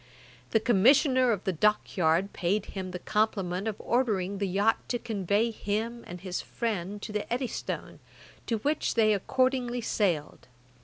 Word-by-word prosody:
The 225 - +3
Commissioner 255 - +4
of 205 -4 -1
the 190 - 0
Dock 210 +6 +1
yard 175 +2 +2
paid 195 +3 0
him 190 -2 -6
the 180 - -5
compliment 200 -2 -1
of 220 - -1
ordering 200 -6 0
the 200 - 0
yacht 200 +4 +2
to 245 - +1
convey 210 0 0
him 225 +3 -3
and 175 0 -8
his 185 -2 -3
friend 205 -4 -3
to - - -5
the 210 +1 -4
Eddystone, 250 0 -3 0.5
to 230 - +1
which 290 +8 -1
they 215 -2 +4
accordingly 250 +3 0
sailed. 180 - -1
210 Hz, 155 wpm, -28 LUFS, 190-235 Hz, 0.5 s, Commissioner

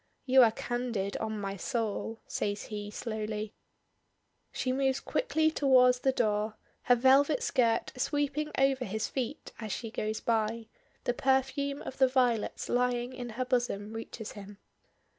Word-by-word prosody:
"You 260 0 +6
are 230 -2 +6
candid, 230 -4 -3
on 220 -1 -3
my 195 -1 -3
soul," 225 0 -3
says 205 0 -2
he 205 -1 -6
slowly. 215 -1 -4 1.0
She 255 - -1
moves 265 0 +1
quickly 315 - +1
towards 255 -4 +5
the 265 - +2
door, 215 -3 0 0.3
her 245 - +6
velvet 270 +3 +4
skirt 230 -3 +1
sweeping 290 +3 -1
over 270 -1 +3
his 220 0 -2
feet 265 +3 -4
as 220 -2 -5
she 225 +2 -4
goes 215 0 -2
by 225 0 0 0.4
the 245 - 0
perfume 270 +2 0
of 260 - -8
the 265 - +6
violets 250 -4 +1
lying 245 0 0
in 245 -1 -6
her 255 - 0
bosom 240 -4 -1
reaches 225 -1 -6
him. 205 0 -10
245 Hz, 145 wpm, -30 LUFS, 215-265 Hz, 1.0 s, You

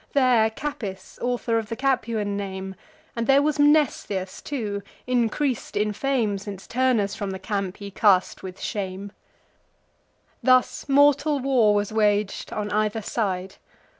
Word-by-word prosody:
There 250 -5 +4
Capys, 220 -7 -6
author 240 -2 0
of 220 - -7
the 230 - -3
Capuan 230 -6 0
name, 190 -1 -5 0.4
And 230 -1 -2
there 275 +1 +5
was 300 0 0
Mnestheus 285 -11 +2
too, 215 -8 -3 0.3
increas'd 250 0 0
in 210 0 +1
fame, 225 -4 0
Since 195 -1 -8
Turnus 235 -5 +1
from 205 -1 -4
the 190 - -4
camp 195 -1 -3
he 200 -1 -8
cast 195 -2 +3
with 185 0 -8
shame. 195 0 -4 1.3
Thus 255 +2 +2
mortal 285 +1 +4
war 250 -6 +3
was 205 +1 -1
wag'd 210 -2 +1
on 210 0 -3
either 215 +1 0
side. 190 -4 -2
215 Hz, 135 wpm, -24 LUFS, 200-255 Hz, 1.3 s, there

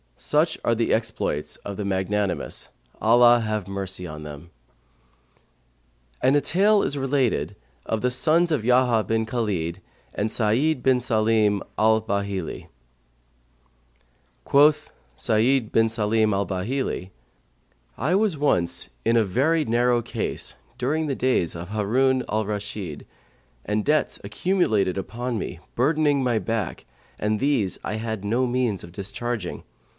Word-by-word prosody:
Such 155 +3 +1
are 115 - +2
the 115 0 +1
exploits 110 -9 -2
of 100 -1 -7
the 105 - -3
magnanimous, 95 0 -2 0.3
Allah 120 +2 +6
have 110 -3 -2
mercy 95 -2 -5
on 75 -1 -8
them! 75 +3 -10 1.7
And 130 +2 +4
a 145 - +4
tale 200 +8 +3
is 145 - -2
related 135 -2 0 0.3
of 110 -1 -2
THE 125 - +1
SONS 165 +6 +3
OF 145 -8 0
YAHYA 125 -2 +3
BIN 110 0 0
KHALID 100 -9 -2 0.3
AND 105 +2 -1
SA'ID 125 +7 +1
BIN 130 -1 +3
SALIM 110 -4 +2 0.2
AL 110 0 +4
BAHILI 100 -4 -3 1.8
Quoth 145 +2 +4 0.3
Sa'νd 115 +2 +2
bin 115 0 +4
Sαlim 110 -1 +1
al'Bαhilν,[FN#135] 100 +2 -2 0.9
I 155 +9 +1
was 200 -5 +1
once 90 -13 0
in 115 0 +3
very 145 - +1
narrow 120 +1 +2
case, - - -4 0.3
during 155 +5 0
the 140 - -1
days 125 -12 +1
of 85 +2 -7
Harun 125 +5 +1
al 110 0 0
Rashid, 105 -6 -5 0.6
and 105 0 -1
debts 150 0 +1
accumulated 105 - 0
upon 115 +5 -3
me, - - -5 0.2
burdening 145 +1 +2
my 120 -3 +1
back, 110 -2 -3 0.3
and 105 0 0
these 135 -9 0
I 105 - -3
had 110 -2 -4
no 120 +5 +1
means 120 -5 -1
of 85 - -10
discharging. 105 +5 -4
115 Hz, 130 wpm, -24 LUFS, 100-130 Hz, 1.8 s, Allah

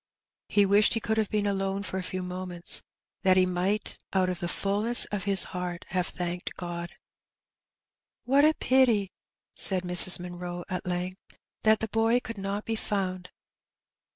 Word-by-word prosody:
He 205 -1 +4
wished 205 +3 +4
he - - +1
could 220 0 -2
have 215 - 0
been 210 -1 0
alone 195 0 -1
for 190 -2 -4
a - - -3
few 185 0 -5
moments^ 180 -1 +2 0.4
that 185 -1 +4
he 185 - +5
might 185 +4 -2
out 185 -1 +2
of 180 -1 -3
the 175 - -3
fulness 205 +6 +2
of 205 -2 -3
his 195 -1 +4
heart 180 -1 -5
have 180 0 -1
thanked 175 0 -5
God. 175 -1 -5 0.7
*' - - -65
What 275 +3 +4
a 310 +1 +4
pity," 235 -7 +2 0.4
said 185 -2 +2
Mrs. 180 +1 +4
Munroe 175 0 -6
at 185 0 -4
length, 180 +2 -5
'* - - -65
that 220 0 +4
the 220 - -1
boy 225 +3 +2
could 230 -3 -8
not 200 +2 -4
be 225 - -2
found." 185 -4 -3
190 Hz, 175 wpm, -27 LUFS, 180-210 Hz, 0.7 s, he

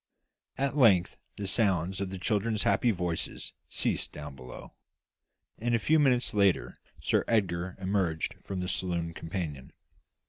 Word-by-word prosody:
At 140 +1 0
length 100 -11 +5 0.2
the 100 - -3
sounds 95 -3 +1
of 100 - -2
the 95 - -5
children's 105 +2 0
happy 100 +5 +3
voices 90 -5 -2 0.2
ceased - - -1
down 75 -2 -8
below: 65 -1 -10 0.9
and, 120 +1 +1
a - - +4
few 155 +8 +3
minutes 130 -5 +3
later, 100 -3 +2 0.2
Sir - - +2
Edgar 95 -5 0
emerged 95 -4 0
from 95 -2 -4
the 90 - -2
saloon 90 -3 -1
companion. 80 -6 -5
95 Hz, 140 wpm, -30 LUFS, 85-110 Hz, 0.9 s, length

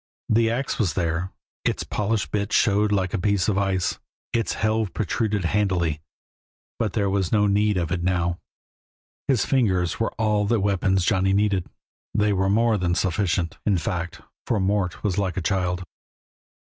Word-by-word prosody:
The 115 +1 +3
ax 130 +4 -2
was 95 -9 +1
there, 85 +1 -1 0.3
its - - 0
polished 105 +1 -1
bit 100 0 -1
showed 105 0 +3
like 95 -3 0
a 105 - 0
piece 100 -1 +1
of 100 -2 +2
ice, 95 -2 0 0.3
its 115 -1 0
helve 110 -2 0
protruded 105 -1 -1
handily, 85 -5 0 0.8
but 110 -4 -1
there 100 -3 +1
was 95 -2 0
no 105 -2 +3
need 105 0 +2
of 85 -3 -1
it 85 -1 -1
now; 85 -1 0 0.9
his 130 -7 +2
fingers 95 -10 +1
were 115 - 0
all 105 -2 +1
the 115 +1 +2
weapons 95 -2 +1
Johnny 95 +1 +2
needed; 100 -3 +1 0.5
they 105 0 +3
were 95 0 +1
more 110 +1 +3
than 90 -1 0
sufficient, 90 -2 0
in 100 -3 +2
fact, 85 0 -3 0.3
for 115 - +1
Mort 95 -1 0
was 100 -2 0
like 95 -3 -1
a - - +2
child. 90 0 -1
100 Hz, 165 wpm, -24 LUFS, 90-105 Hz, 0.9 s, The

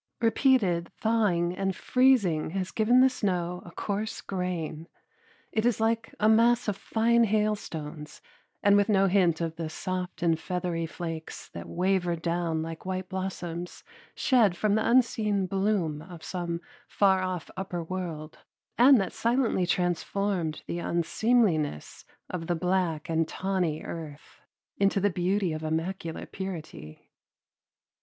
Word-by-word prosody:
Repeated 225 -7 +2
thawing 195 -6 +1
and 195 -1 -1
freezing 240 -14 +3
has 185 -1 -2
given 240 +3 +4
the 260 - +7
snow 180 -7 -2
a - - -11
coarse 210 +5 -3
grain. 170 -4 -4 0.6
It 220 - 0
is 240 -2 +2
like 225 0 0
a 215 - +3
mass 230 +2 +4
of 205 - 0
fine 230 +3 +2
hailstones 185 -8 -2 0.4
and 205 0 +6
with 205 +1 +3
no 195 -2 +4
hint 180 -4 +3
of 165 -1 -3
the 165 -1 -3
soft 185 +2 -4
and 165 -2 +2
feathery 175 -2 -2
flakes 165 -1 -6
that - - -8
wavered 180 -2 0
down 170 -2 -1
like 165 0 -7
white 185 0 -4
blossoms 180 -2 -5 0.3
shed 220 -9 +3
from 210 +1 +1
the 220 +2 +1
unseen 220 -5 +2
bloom 190 -5 0
of 170 -1 -11
some 175 -2 -3 0.3
far 190 -2 +3
off 185 -2 -4
upper 185 -2 -4
world 165 -3 -5 0.4
and 260 +1 +8
that 195 - -2
silently 230 -6 +1
transformed 175 -1 -1
the 170 - -4
unseemliness 170 - 0 0.2
of 165 -3 -5
the 175 - +1
black 180 -3 0
and 165 -1 +1
tawny 185 -5 -1
earth 155 -3 -9 0.4
into 195 0 +2
the 200 +1 +2
beauty 180 0 0
of 155 - -4
immaculate 165 +1 -3
purity. 165 - -7
185 Hz, 135 wpm, -28 LUFS, 170-210 Hz, 0.6 s, and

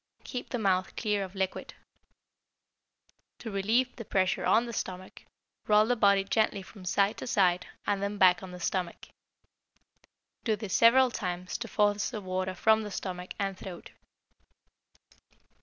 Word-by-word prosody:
Keep 250 - -6
the 245 - -2
mouth 190 -4 0
clear 210 -3 0
of 190 +1 -9
liquid. 190 -1 -3 1.6
To 225 - -7
relieve 225 +6 +1
the 230 - -6
pressure 190 -3 0
on 230 +2 +3
the 235 - -6
stomach, 185 -2 -6 0.4
roll 210 0 +5
the 245 +2 +1
body 200 -3 +4
gently 200 0 0
from 190 -1 -13
side 200 +3 +1
to - - -6
side 180 -5 +2 0.2
and 200 -1 0
then 200 +1 -2
back 180 -2 +5
on 190 - -8
the 180 0 -9
stomach. 180 0 -3 1.3
Do 220 -3 +1
this 210 -2 -6
several 250 +2 +6
times 180 -3 -4
to 235 - -5
force 205 -1 +1
the 225 - -5
water 185 -1 -3
from 220 +3 +3
the 210 - -5
stomach 185 -2 -6
and 195 -1 -2
throat. 185 -1 -9
200 Hz, 155 wpm, -29 LUFS, 185-220 Hz, 1.6 s, several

